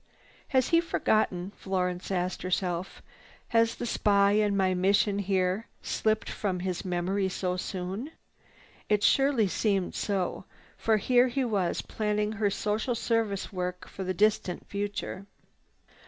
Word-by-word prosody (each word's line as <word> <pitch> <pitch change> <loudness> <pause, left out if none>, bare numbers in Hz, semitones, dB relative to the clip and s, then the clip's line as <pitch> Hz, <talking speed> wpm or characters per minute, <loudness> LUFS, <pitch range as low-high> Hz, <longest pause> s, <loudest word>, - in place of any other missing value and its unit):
"Has 260 -3 +2
he 335 0 +5
forgotten?" 200 - 0
Florence 180 -2 -2
asked 180 -1 -1
herself. 180 0 -2 0.5
"Has 230 0 +3
the - - -4
spy 200 -3 +3
and 205 -1 +2
my 190 -1 +2
mission 200 +2 +2
here 190 +1 0 0.2
slipped 215 0 0
from 185 -4 -2
his 185 -1 -2
memory 190 +2 0
so 180 -1 -2
soon?" 190 +7 -4 0.8
It 210 -1 +2
surely 270 -5 +4
seemed 195 -1 0
so, 195 -3 -2 0.3
for 220 -1 +2
here 245 +4 +4
he 255 +1 -1
was 200 -7 0
planning 210 -1 -1
her 215 -1 +1
social 215 +4 -1
service 225 -4 -1
work 180 -1 -4
for 195 - -6
the 185 0 -2
distant 205 -4 +1
future. 200 -1 -4
200 Hz, 135 wpm, -28 LUFS, 185-215 Hz, 0.8 s, he